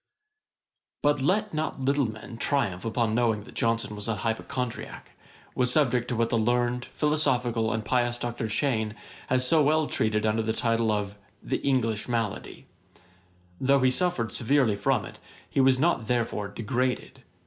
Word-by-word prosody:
] - - -61
But 145 -1 +2
let 205 +7 +1
not 155 -2 -2
little 140 -2 +1
men 110 +2 -10
triumph 115 -11 0
upon 115 -1 0
knowing 115 -3 +1
that - - -14
Johnson 115 -2 0
was 105 +1 -5
an 115 -2 -1
HYPOCHONDRIACK, 115 +3 -4 0.4
was 125 -1 +2
subject 125 -5 +2
to 125 - -2
what 115 0 0
the 115 - +2
learned, 120 +2 +1
philosophical, 125 -7 0
and 110 -1 -2
pious 120 +1 +1
Dr. 120 -2 -3
Cheyne 110 -3 0 0.3
has 130 0 +2
so 160 +3 +4
well 155 +2 +3
treated 110 -5 0
under 110 +1 +1
the 110 0 -1
title 115 -1 +1
of 105 -1 -2 0.3
'The - - -1
English 115 -6 0
Malady.' 115 -4 -3 0.9
Though 135 +1 +3
he 130 0 +4
suffered 150 -8 0
severely 125 -3 +2
from 120 -1 0
it, - - -11 0.3
he 135 - +1
was 130 -1 +5
not 135 -6 +1
therefore 115 -4 -1
degraded. 125 +4 -2
120 Hz, 160 wpm, -27 LUFS, 110-135 Hz, 0.9 s, was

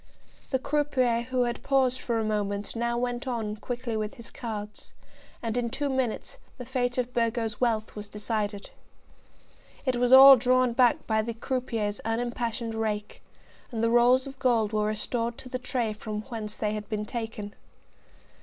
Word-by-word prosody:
The 265 - +2
croupier 260 -4 +1
who 255 -1 +2
had 240 -1 -2
paused 260 -2 +2
for 235 -2 -1
a 225 - 0
moment 205 -1 -2
now 235 +1 0
went 245 +1 -2
on 225 -4 -2
quickly 240 +1 -4
with 215 +3 -3
his 235 -3 -11
cards, 210 -3 -6 0.5
and 225 -1 -2
in 240 -1 0
two 285 +4 -2
minutes 260 -4 -2 0.2
the 250 - -7
fate 245 -1 -1
of 250 0 -1
Burgo's 230 -2 -1
wealth 225 -3 0
was 205 -1 -7
decided. 210 -1 -3 1.1
It 255 -2 +1
was 245 0 +2
all 270 +1 +11
drawn 255 0 +3
back 245 0 +3
by 220 -1 +2
the 230 +1 -4
croupier's 230 -4 -2
unimpassioned 230 0 -2
rake, 215 -2 -3 0.5
and 230 -2 -2
the 230 - +3
rolls 245 +2 +5
of 270 -1 -9
gold 230 -5 +2
were 210 0 +1
restored 230 +2 -2
to 255 - -9
the 255 0 -3
tray 245 -3 -1
from 215 0 -5
whence 215 -4 -6
they 210 -1 -1
had 210 -1 -5
been 210 -1 -2
taken. 220 -3 -5
235 Hz, 170 wpm, -27 LUFS, 215-250 Hz, 1.1 s, all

